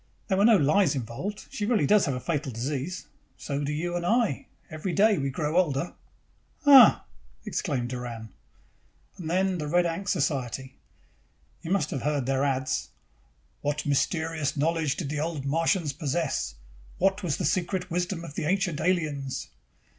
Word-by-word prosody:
"There 190 Hz, -, +2 dB
were 200 Hz, -, +5 dB
no 225 Hz, -2 st, +7 dB
lies 165 Hz, +3 st, +3 dB
involved. 135 Hz, -, -5 dB
She 205 Hz, -, -3 dB
really 220 Hz, -11 st, +2 dB
does 205 Hz, +1 st, +4 dB
have 135 Hz, -, 0 dB
a -, -, -3 dB
fatal 145 Hz, -2 st, -2 dB
disease. 135 Hz, +9 st, -4 dB, 0.3 s
So 145 Hz, 0 st, -3 dB
do 145 Hz, -, -2 dB
you 175 Hz, +4 st, -2 dB
and 175 Hz, -, -2 dB
I. 225 Hz, -, +1 dB, 0.2 s
Every 155 Hz, +4 st, -3 dB
day 210 Hz, -2 st, +4 dB
we 135 Hz, 0 st, -1 dB
grow 150 Hz, +3 st, -2 dB
older." 165 Hz, -2 st, +1 dB, 0.7 s
"Uh!" 275 Hz, -3 st, +9 dB, 0.4 s
exclaimed 130 Hz, -8 st, -2 dB
Doran. 120 Hz, -3 st, -6 dB, 0.9 s
"And 165 Hz, -3 st, -5 dB
then 185 Hz, +1 st, +1 dB
the 150 Hz, -, -3 dB
Red 175 Hz, +3 st, +3 dB
Ankh 170 Hz, +4 st, -3 dB
Society. 135 Hz, -, -1 dB, 0.9 s
You 160 Hz, -, -7 dB
must 185 Hz, -6 st, +1 dB
have 135 Hz, -, -2 dB
seen 145 Hz, -, 0 dB
or -, -, 0 dB
heard 140 Hz, -4 st, -1 dB
their 135 Hz, +1 st, +1 dB
ads. 135 Hz, -1 st, -1 dB, 0.7 s
'What 150 Hz, +1 st, -2 dB
mysterious 155 Hz, 0 st, 0 dB
knowledge 160 Hz, -1 st, +1 dB
did 155 Hz, -6 st, -4 dB
the 150 Hz, 0 st, -2 dB
Old 155 Hz, -3 st, -3 dB
Martians 165 Hz, +1 st, +1 dB
possess? 145 Hz, -, -2 dB, 0.4 s
What 195 Hz, +2 st, +2 dB
was 165 Hz, -7 st, -1 dB
the -, -, -2 dB
secret 180 Hz, 0 st, -1 dB
wisdom 175 Hz, 0 st, -2 dB
of 155 Hz, -, -9 dB
the 155 Hz, -, -3 dB
Ancient 180 Hz, -2 st, 0 dB
Aliens? 150 Hz, -7 st, -1 dB
155 Hz, 170 wpm, -27 LUFS, 140-180 Hz, 0.9 s, Uh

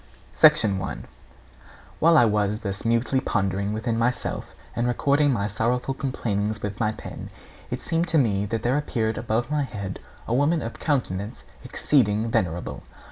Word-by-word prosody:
I. -, -, +12 dB, 1.5 s
While 165 Hz, 0 st, +6 dB
I 120 Hz, -, +7 dB
was 105 Hz, 0 st, +1 dB
thus 100 Hz, -1 st, -4 dB
mutely 115 Hz, +3 st, +2 dB
pondering 100 Hz, -3 st, -1 dB
within 115 Hz, +1 st, -1 dB
myself, 120 Hz, +2 st, -2 dB, 0.2 s
and 120 Hz, +1 st, 0 dB
recording 140 Hz, +4 st, +2 dB
my 100 Hz, -6 st, 0 dB
sorrowful 120 Hz, +5 st, 0 dB
complainings 110 Hz, -6 st, -2 dB
with 105 Hz, 0 st, -4 dB
my 110 Hz, -2 st, +2 dB
pen, 110 Hz, -, -8 dB, 0.4 s
it -, -, -4 dB
seemed 165 Hz, +1 st, 0 dB
to 165 Hz, -, +2 dB
me 105 Hz, -7 st, +2 dB
that 115 Hz, +1 st, -2 dB
there 125 Hz, +4 st, +2 dB
appeared 115 Hz, -6 st, -1 dB
above 120 Hz, +3 st, -1 dB
my 150 Hz, -1 st, +1 dB
head 100 Hz, -8 st, -5 dB, 0.3 s
a 115 Hz, -, -1 dB
woman 145 Hz, +5 st, +2 dB
of 115 Hz, -, -4 dB
a -, -, -13 dB
countenance 115 Hz, -, -2 dB, 0.2 s
exceeding 115 Hz, -5 st, +1 dB
venerable. 90 Hz, -7 st, -1 dB
115 Hz, 155 wpm, -25 LUFS, 105-130 Hz, 1.5 s, I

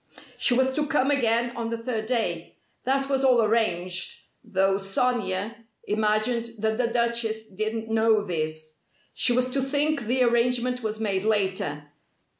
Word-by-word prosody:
She 245 Hz, -, +2 dB
was 260 Hz, +1 st, +2 dB
to 300 Hz, +1 st, 0 dB
come 290 Hz, -2 st, +2 dB
again 240 Hz, -3 st, +1 dB
on 230 Hz, -1 st, -3 dB
the 230 Hz, -, -2 dB
third 230 Hz, -2 st, -3 dB
day. 180 Hz, -9 st, -2 dB, 0.3 s
That 270 Hz, +1 st, +1 dB
was 270 Hz, -1 st, 0 dB
all 255 Hz, -2 st, +5 dB
arranged, 185 Hz, -5 st, 0 dB, 0.2 s
though 195 Hz, +1 st, +1 dB
Sonia 205 Hz, 0 st, -1 dB, 0.3 s
imagined 215 Hz, +3 st, 0 dB
that 220 Hz, +2 st, -1 dB
the 245 Hz, -, +2 dB
Duchess 235 Hz, -2 st, -1 dB
didn't 215 Hz, +3 st, -3 dB
know 220 Hz, -1 st, +3 dB
this. 155 Hz, -3 st, -4 dB, 0.3 s
She -, -, +2 dB
was 250 Hz, +1 st, +2 dB
to 275 Hz, +1 st, 0 dB
think 285 Hz, +2 st, 0 dB
the 250 Hz, +3 st, +2 dB
arrangement 245 Hz, +1 st, +1 dB
was 215 Hz, -1 st, -3 dB
made 200 Hz, -3 st, -1 dB
later. 190 Hz, -9 st, -1 dB
225 Hz, 150 wpm, -25 LUFS, 205-250 Hz, 0.3 s, all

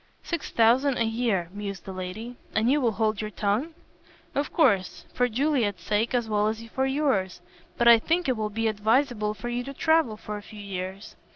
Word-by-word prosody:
"Six 335 Hz, -3 st, -4 dB
thousand 245 Hz, +4 st, +3 dB
a -, -, +2 dB
year," 225 Hz, -6 st, 0 dB
mused 200 Hz, -2 st, -6 dB
the 195 Hz, -, -6 dB
lady, 185 Hz, +7 st, -6 dB, 0.2 s
"and 225 Hz, +3 st, +3 dB
you 295 Hz, +1 st, +3 dB
will 235 Hz, -3 st, +2 dB
hold 215 Hz, -1 st, 0 dB
your 215 Hz, -, -4 dB
tongue?" 215 Hz, +10 st, -1 dB, 0.6 s
"Of 285 Hz, +1 st, -1 dB
course, 195 Hz, -, +2 dB
for 250 Hz, 0 st, +1 dB
Juliet's 235 Hz, -, 0 dB
sake 215 Hz, +6 st, 0 dB
as 240 Hz, -2 st, 0 dB
well 210 Hz, -1 st, +1 dB
as 220 Hz, +1 st, -2 dB
for 265 Hz, +3 st, 0 dB
yours. 265 Hz, -11 st, 0 dB, 0.4 s
But 235 Hz, -, +3 dB
I 235 Hz, -1 st, +9 dB
think 335 Hz, +7 st, 0 dB
it 255 Hz, -, +2 dB
will 215 Hz, -1 st, -2 dB
be 225 Hz, +2 st, -1 dB
advisable 220 Hz, 0 st, +1 dB
for 210 Hz, +4 st, -7 dB
you 240 Hz, +1 st, -2 dB
to 275 Hz, +2 st, -8 dB
travel 315 Hz, -9 st, +2 dB
for 210 Hz, -1 st, -6 dB
a -, -, -8 dB
few 210 Hz, +1 st, -12 dB
years." 190 Hz, 0 st, -6 dB
220 Hz, 200 wpm, -26 LUFS, 205-255 Hz, 0.6 s, I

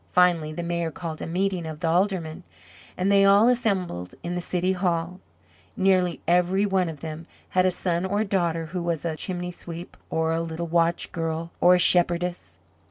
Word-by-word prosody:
Finally 175 Hz, -4 st, +3 dB
the 170 Hz, +3 st, -5 dB
Mayor 170 Hz, -1 st, -1 dB
called 160 Hz, 0 st, -6 dB
a -, -, -4 dB
meeting 180 Hz, 0 st, -1 dB
of 155 Hz, -1 st, -7 dB
the 165 Hz, -, -1 dB
Aldermen, 175 Hz, -1 st, 0 dB, 0.6 s
and 185 Hz, +2 st, +1 dB
they 200 Hz, 0 st, +5 dB
all 200 Hz, +3 st, +6 dB
assembled 190 Hz, -, 0 dB
in 175 Hz, -, -3 dB
the 175 Hz, -, -2 dB
City 180 Hz, +1 st, -1 dB
Hall. 180 Hz, -1 st, -1 dB, 0.6 s
Nearly 185 Hz, -3 st, +2 dB
every 180 Hz, +3 st, +3 dB
one 190 Hz, -3 st, +1 dB
of 150 Hz, -3 st, -9 dB
them 160 Hz, +1 st, -7 dB, 0.2 s
had 185 Hz, 0 st, +3 dB
a -, -, +2 dB
son 175 Hz, -1 st, -1 dB
or 205 Hz, +2 st, 0 dB
a -, -, 0 dB
daughter 170 Hz, -5 st, 0 dB
who 175 Hz, +3 st, -4 dB
was 170 Hz, -2 st, -2 dB
a 160 Hz, -2 st, -1 dB
chimney 180 Hz, +1 st, -4 dB
sweep, 170 Hz, 0 st, -9 dB
or 160 Hz, 0 st, 0 dB
a 165 Hz, 0 st, 0 dB
little 165 Hz, +1 st, -4 dB
watch 170 Hz, 0 st, +1 dB
girl, 165 Hz, 0 st, -3 dB
or 180 Hz, +1 st, +7 dB
a -, -, +3 dB
shepherdess. 175 Hz, -, +2 dB
175 Hz, 190 wpm, -25 LUFS, 165-185 Hz, 0.6 s, or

